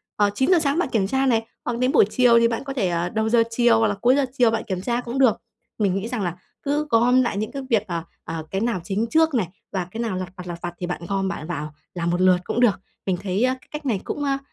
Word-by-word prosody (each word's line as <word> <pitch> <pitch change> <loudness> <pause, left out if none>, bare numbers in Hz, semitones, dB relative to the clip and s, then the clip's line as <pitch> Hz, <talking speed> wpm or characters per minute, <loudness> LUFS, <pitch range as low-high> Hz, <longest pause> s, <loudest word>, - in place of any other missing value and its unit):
ờ, 205 -1 +3
9:00 305 - +4
sáng 290 -1 0
bạn 355 - 0
kiểm 205 -6 +1
tra 265 +5 +1
này 225 -4 +2 0.2
hoặc 240 -1 -1
đến 255 +1 +2
buổi - - +6
chiều 240 0 +5
thì 230 - +4
bạn 230 +1 -3
có 275 -1 -5
thể, 210 -9 0
ờ, 170 0 -1
đầu 220 +2 0
giờ 230 0 +5
chiều 230 0 +3
hoặc 225 - +3
là 205 - -1
cuối 250 +2 +5
giờ 280 -1 +2
chiều 245 -3 +5
bạn 225 0 -1
kiểm 185 -3 -2
tra 240 +4 -1
cũng 245 +2 -4
được. 255 -5 +5 0.4
Mình 200 -4 +1
nghĩ 195 +3 -2
rằng 240 -2 -3
là 175 -2 -2 0.3
cứ 295 +1 0
gom 245 +2 +4
lại 240 -5 -1
những 215 +1 -2
cái 275 - -5
việc, 220 -4 +3
ờ, 170 -3 -3 0.2
ờ, 160 -1 -5
cái 195 - -1
nào 230 -6 0
chính 200 +5 -1
trước 320 +1 +3
này 220 -8 +1 0.2
và 185 -3 -2
cái 225 - -4
nào 225 -5 -2
lặt 185 -1 -4
vặt, 180 -1 -9
lặt 170 -1 -6
vặt 175 -1 -4
thì 180 - -3
bạn 175 - -4
gom, 195 0 -1
bạn 170 -4 -5
vào 155 -3 -4 0.2
làm 170 -1 -2
một 175 +1 0
lượt 185 -1 +5
cũng 230 - -2
được. 235 -6 +3 0.3
Mình 185 -2 0
thấy, 195 +3 0
a, 255 0 +3
cái - - -23
cách 300 0 -6
này 220 -8 0
cũng, 290 - -4
a, 275 -1 +1
225 Hz, 295 wpm, -23 LUFS, 185-250 Hz, 0.4 s, buổi